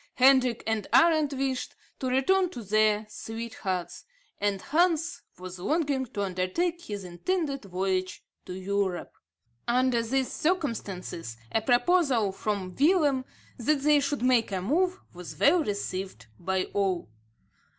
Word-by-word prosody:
Hendrik 255 -2 +4
and 220 -2 -1
Arend 315 -3 +5
wished 265 -1 -2 0.2
to 260 - -2
return 350 +9 +2
to 245 -9 -8
their 215 +1 +2
sweethearts; 210 -5 -5 0.4
and 200 -1 0
Hans 325 - +1 0.2
was 185 0 -8
longing 280 - 0
to 210 -4 -3
under 185 -1 -1
take 345 - -1
his 205 -2 -5
intended 275 - -2
voyage 185 0 -2 0.2
to - - -5
Europe. 190 -1 -2 0.5
Under 250 0 +2
these 260 +3 -1
circumstances, 205 - -2
a 225 - +1
proposal 245 - +3
from 195 -2 -3
Willem, 290 - +3 0.3
that 280 +4 +1
they 295 +1 +5
should 280 -2 -2
make 250 -4 +3
a 190 - -1
move, 355 - +1
was 180 -1 -9
well 320 +3 +4
received 195 -3 -4
by 190 +1 0
all. 190 - 0
235 Hz, 130 wpm, -28 LUFS, 195-290 Hz, 0.5 s, Arend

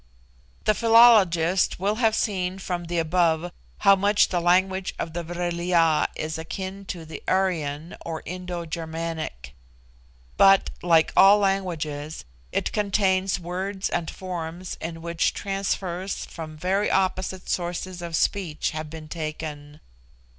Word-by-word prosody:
The 215 - +3
philologist 205 -8 +5
will 205 +3 0
have 225 -2 +3
seen 185 -4 -1
from 180 -2 -4
the 175 +1 -3
above 170 0 +1 0.3
how 200 -1 +7
much 205 +2 +3
the 180 - 0
language 185 +2 +2
of 160 - -4
the 175 - -2
Vril 175 0 -3
ya 165 -3 +3
is 160 +1 -4
akin 190 +4 -6
to 170 -3 -6
the 155 -2 -8
Aryan 165 -5 -1
or 160 -1 -5
Indo 180 0 -5
Germanic; 160 - -5 0.8
but, 195 0 +6
like 165 -2 +3
all 195 +2 +8
languages, 165 - -2 0.3
it - - -1
contains 195 -2 +1
words 190 +3 -3
and 170 -2 -1
forms 175 -1 -6
in 165 0 -6
which 170 -1 0
transfers 195 -1 -3
from 155 -1 -8
very 190 +5 0
opposite 185 -1 -1
sources 175 +1 -3
of 170 -1 -4
speech 175 -3 0
have 155 -1 -5
been 155 0 -9
taken. 155 -2 -6
175 Hz, 130 wpm, -25 LUFS, 160-190 Hz, 0.8 s, all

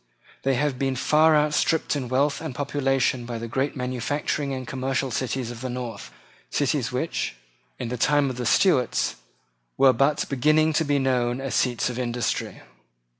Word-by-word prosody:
They 135 0 +1
have 135 -1 -1
been 135 -1 0
far 155 +4 +4
outstripped 150 +1 +2
in 130 -4 -3
wealth 140 +3 +1
and 155 -6 -5
population 135 -3 0
by 120 -1 -4
the 115 +1 -5
great 130 +5 -1
manufacturing 135 +3 -2
and 130 -1 -4
commercial 135 0 -2
cities 125 0 -2
of 120 -1 -9
the 130 - -3
north, 120 - -6 0.4
cities - - 0
which, - - -2 0.4
in - - -4
the 125 - -3
time 145 +3 +3
of 125 - -8
the 125 -2 -2
Stuarts, 130 - +2 0.6
were 135 -1 +6
but 140 +3 +1
beginning 155 +4 +3
to 160 - +2
be 145 -1 +1
known 125 -2 +1
as 135 -1 -4
seats 125 -2 +1
of 125 0 -4
industry. 120 -1 -2
130 Hz, 170 wpm, -25 LUFS, 125-145 Hz, 0.6 s, were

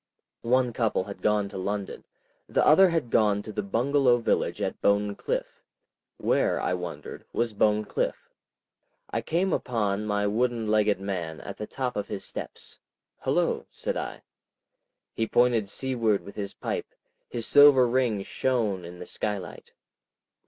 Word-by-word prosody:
One 125 0 +2
couple 110 -5 +1
had 100 +1 -9
gone 105 -1 +2
to 95 - -6
London; 100 +1 -4 0.4
the - - +2
other 190 +5 +7
had 160 -9 -1
gone 105 -2 +3
to 110 - -7
the 105 - -2
Bungalow 125 +5 +2
village 115 - 0
at - - -3
Bone 100 0 +2
Cliff. - - -4 0.6
Where, - - +1
I - - 0
wondered, 90 -2 -6
was 115 -2 0
Bone 105 +1 +2
Cliff? - - -3 0.8
I - - -1
came 180 +3 0
upon 105 -4 -1
my 105 0 0
wooden 115 +2 0
legged 105 -2 +2
man 90 -5 -4
at 100 - -8
the 105 - -5
top 130 -2 -3
of 105 - -3
his - - -5
steps. - - -8 0.4
"Hullo," - - 0
said - - -4
I. - - -5 0.9
He 115 - -1
pointed 120 -5 +3
seaward 115 -6 0
with 100 - -11
his 100 -1 -5
pipe, - - -4 0.3
his 115 -2 -3
silver 145 -3 +7
ring 120 -5 +1
shone 110 -6 -1
in 90 +1 -9
the 90 - -8
sky 105 +2 -2
light. 90 -4 -10
105 Hz, 155 wpm, -27 LUFS, 100-125 Hz, 0.9 s, other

